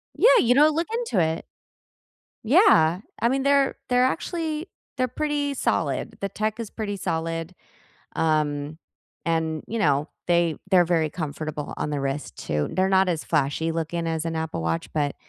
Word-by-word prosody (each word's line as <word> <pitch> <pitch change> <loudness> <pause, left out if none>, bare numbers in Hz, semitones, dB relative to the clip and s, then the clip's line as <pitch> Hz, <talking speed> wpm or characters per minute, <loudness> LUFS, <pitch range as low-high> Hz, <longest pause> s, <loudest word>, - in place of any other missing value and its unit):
Yeah, - - +6
you 245 +1 +4
know, 300 +3 +6
look 330 +3 -1
into 460 - 0
it. 160 +1 -2 1.0
Yeah, 220 - +5 0.2
I 235 - +3
mean, 265 +1 0
they're 280 -1 +3
they're 250 0 +4
actually 320 +3 -2 0.3
they're 255 0 +1
pretty 290 +1 -1
solid. - - -1
The 200 - -1
tech 215 +3 -2
is 220 - -5
pretty 205 -2 -4
solid. 165 0 -3 0.6
Um, 150 -1 0 0.5
and, 160 -2 -1
you 230 +2 -3
know, 145 -3 +2 0.2
they 170 -3 +2
they're 180 -2 +6
very 165 -3 +1
comfortable 155 -2 -5
on 150 - -2
the 145 - -2
wrist 135 +1 -3
too. 75 -1 -2
They're 190 +1 +2
not 190 -1 +4
as 165 -3 -1
flashy 155 +1 0
looking 165 +1 -2
as 160 0 -2
an 165 -1 -2
Apple 160 - -3
Watch, 80 0 -2
but, 145 -2 0
170 Hz, 165 wpm, -24 LUFS, 155-250 Hz, 1.0 s, Yeah